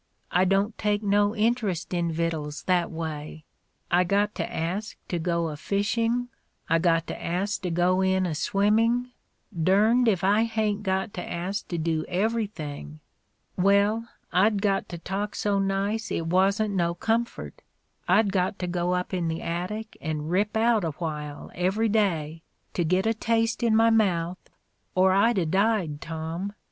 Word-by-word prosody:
I 180 +1 +3
don't 195 +3 +1
take 210 0 0
no 205 +1 +2
interest 210 -6 0
in 170 -1 0
vittles, 160 -2 -3
that 180 -2 +1
way. 160 -1 -6 0.5
I 180 +1 +5
got 205 +3 +1
to 165 - -4
ask 185 +6 -3
to 175 - -1
go 170 0 0
a 150 - -5
fishing; 230 +7 0 0.4
I 165 +1 +3
got 165 -1 +2
to - - -7
ask 190 +4 -1
to 185 - -2
go 175 +2 +2
in 190 0 +2
a 170 - -1
swimming 225 +8 +1 0.2
— 170 -7 -8
dern'd 215 +7 +4
if 190 -4 +2
I 205 +4 +4
hain't 215 -2 -1
got 190 +1 -1
to 180 - -5
ask 185 +4 -3
to 175 - -3
do 160 -1 0
everything. 180 - -3 0.6
Well, 200 +4 +3 0.3
I'd 205 +3 +3
got 195 -2 +1
to 175 - -6
talk 195 +4 -4
so 205 -1 0
nice 195 +3 -1
it 165 - -2
wasn't 195 +5 +2
no 170 -2 0
comfort 225 - -2 0.3
— - - -47
I'd 200 +3 +4
got 190 0 0
to 180 - -3
go 175 0 0
up 180 +1 -3
in 175 -2 0
the 160 0 -3
attic 195 +6 -4
and 155 -1 -3
rip 205 +4 +1
out 225 -2 +3
a 160 -3 -2
while, 150 -2 -5
every 195 +5 +1
day, 165 -7 0 0.3
to 175 - 0
git 185 +4 +1
a 225 - +3
taste 230 0 0
in 230 -2 +3
my 225 +1 +5
mouth, 180 -5 +1 0.6
or 185 +1 +5
I'd 205 +4 +3
a 180 - +2
died, 190 -4 +1
Tom. 165 +4 -4
190 Hz, 170 wpm, -26 LUFS, 170-210 Hz, 0.6 s, I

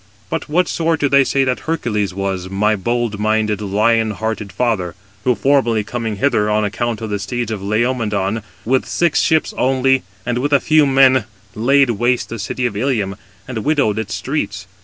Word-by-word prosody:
But 165 - -3
what 175 +3 +2
sort 165 -1 0
do 145 - +2
they 140 0 +5
say 135 +1 +1
that 130 -1 0
Hercules 105 -11 -1
was, 95 -1 -3
my 105 +3 +1
bold 115 +1 -2
minded, 110 -1 0
lion 110 +3 +2
hearted 105 -1 -4
father? 110 -8 -1 0.3
who 125 - +3
formerly 125 -6 +2
coming 110 0 -3
hither, 105 -2 +1
on 105 0 +1
account 115 +2 -2
of 110 -2 -4
the 105 - -1
steeds 115 +4 -3
of 105 -3 -4
Laomedon, 110 -1 0 0.2
with 130 +3 +1
six 170 -3 +1
ships 160 -1 +1
only, 130 0 +2 0.2
and 120 0 -1
with 145 +3 -1
a 140 - +6
few 155 0 +3
men, 135 -1 +4 0.3
laid 135 +4 +3
waste 120 +3 0
the 115 - -6
city 125 +5 -3
of 120 - -2
Ilium, 105 -4 -1 0.3
and 125 -3 -4
widowed 140 -9 +1
its 110 - -3
streets. - - -3
115 Hz, 180 wpm, -18 LUFS, 105-130 Hz, 0.3 s, a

